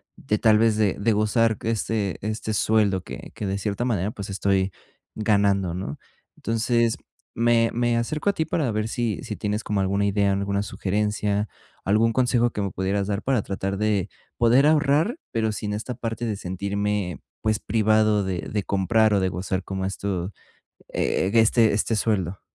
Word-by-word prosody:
de, 105 - -1
tal 110 -1 +4
vez, 110 -1 +3
de 105 -3 +2
de 110 +2 +2
gozar 110 +1 +2
que 115 - -2
esté 105 -3 -1
este 110 +1 -3
sueldo 105 -3 +2
que - - -9
que, 105 - -4
de 95 +1 -1
cierta 105 +3 -2
manera, 105 -4 0
pues, 100 -2 -7
estoy 95 0 +1 0.4
ganando, 100 -4 +2
¿no? 90 -5 -5 0.4
Entonces, 115 0 +1 0.4
me 115 0 +3
me 120 0 +1
acerco 150 +10 -1
a - - +2
ti 160 - -1
para 145 -8 0
ver 105 0 -1
si 115 -2 -2
si 105 - -5
tienes 105 +1 -2
como 105 -1 -1
alguna 100 +1 +1
idea, 100 0 +2
alguna 100 0 0
sugerencia, 105 +1 -1 0.4
algún 110 +3 +2
consejo 120 -1 +2
que 105 - -3
me 100 - -1
pudieras 95 +2 -1
dar 100 0 -2
para 130 -4 +1
tratar 95 0 -3
de 105 -3 +1 0.3
poder 120 +5 +5
ahorrar, 155 - +3
pero 110 -1 0
sin 105 0 -3
esta 115 +4 -4
parte 115 0 -4
de 110 - -1
sentirme, 100 -1 -2 0.2
pues, 110 -1 +1
privado 110 -1 +2
de 95 -2 -2
de 105 - -2
comprar 105 +3 +2
o - - +3
de 95 -1 +1
gozar, 95 +1 -3
como 95 -1 -3
esto, 95 -1 -3 0.6
eh, 95 - 0
este 115 0 +4
este 110 +2 +1
sueldo. 100 -4 -1
105 Hz, 175 wpm, -24 LUFS, 100-115 Hz, 0.6 s, poder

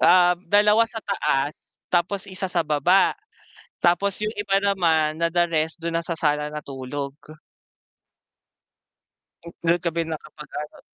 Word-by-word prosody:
Ah, 180 0 +6
2 210 +2 +5
sa 230 - -12
taas 150 -8 -2
tapos 185 +3 0
1 190 0 -5
sa 175 -1 0
baba. 160 +6 +3 0.7
Tapos 180 +3 +3
yung 215 - -1
iba 200 -1 +1
naman, 165 -6 +2
na 170 - +4
the 175 +1 +2
rest 160 0 -1
dun 170 0 -2
na - - -6
sana 150 -3 0
natulog. 140 -1 -5 2.5
Dun 170 +1 +4
kami 170 -1 -1
nakapag 155 -1 -8
ano 150 0 -9
170 Hz, 125 wpm, -24 LUFS, 150-190 Hz, 2.5 s, Ah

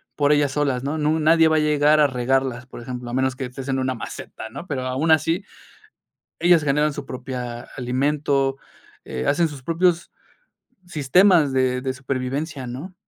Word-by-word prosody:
por 145 0 +2
ellas 145 -2 +3
solas, 135 -3 0
¿no? 145 +3 -2
No 150 - +1
nu 160 - +1
nadie 160 +1 +5
va 160 - +2
a - - +4
llegar 150 0 +3
a 150 - +6
regarlas, 130 -1 -1
por 125 - -10
ejemplo, 125 0 -6
a - - -6
menos 130 0 0
que 130 - -4
estés 130 +2 -8
en 135 -1 0
una 130 0 -1
maceta, 110 -1 -8
¿no? 140 +9 -9
Pero 135 -6 -3
aun 130 +6 0
así 165 +4 +2 1.0
ellas 175 -2 +4
generan 150 +1 +1
su 145 0 -6
propia 125 -2 -6 0.2
alimento, 135 +2 0 0.5
eh, 65 0 -4
hacen 165 +4 +3
sus 145 -4 -10
propios 170 +2 +1 0.8
sistemas 160 0 +4
de 130 -1 +1
de 130 0 -2
supervivencia, 135 +2 -4
¿no? 140 +10 -7
140 Hz, 180 wpm, -22 LUFS, 130-150 Hz, 1.0 s, a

